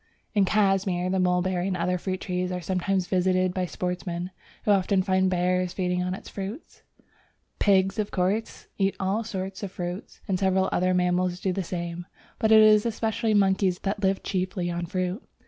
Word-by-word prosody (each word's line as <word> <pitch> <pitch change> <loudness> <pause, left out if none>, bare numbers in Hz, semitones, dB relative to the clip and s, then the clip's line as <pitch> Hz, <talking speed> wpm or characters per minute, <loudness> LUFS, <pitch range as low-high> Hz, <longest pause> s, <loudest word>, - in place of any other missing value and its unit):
In 200 -3 +4
Cashmir 195 -3 +1
the 190 - +1
mulberry 180 0 +1
and 185 -2 -1
other 180 +1 0
fruit 185 0 -3
trees 180 0 -2
are 180 - -2
sometimes 185 +2 -1
visited 185 0 +1
by 185 -1 -1
sportsmen, 180 0 -4 0.3
who 210 - +4
often 195 -1 +3
find 190 0 +2
bears 180 0 +1
feeding 180 -1 -1
on 180 0 -1
the 190 - -6
fruits. 200 - -7 0.8
Pigs, 195 +1 +3
of 210 - 0
course, 195 +5 -1
eat 195 0 +2
all 195 +4 0
sorts 190 -3 -5
of 200 -3 -5
fruit, 180 +1 -6
and 190 -3 0
several 190 -1 +2
other 185 0 +2
mammals 180 0 +1
do 185 0 -1
the 195 - -1
same, 175 0 -5 0.3
but 220 -1 +2
it 220 0 +8
is 215 -1 +6
especially 225 -1 0
monkeys 190 -2 +3
that 200 +1 -2
live 195 -1 +1
chiefly 185 -2 -2
on 170 0 -3
fruit. 185 - -2
185 Hz, 180 wpm, -26 LUFS, 180-195 Hz, 0.8 s, it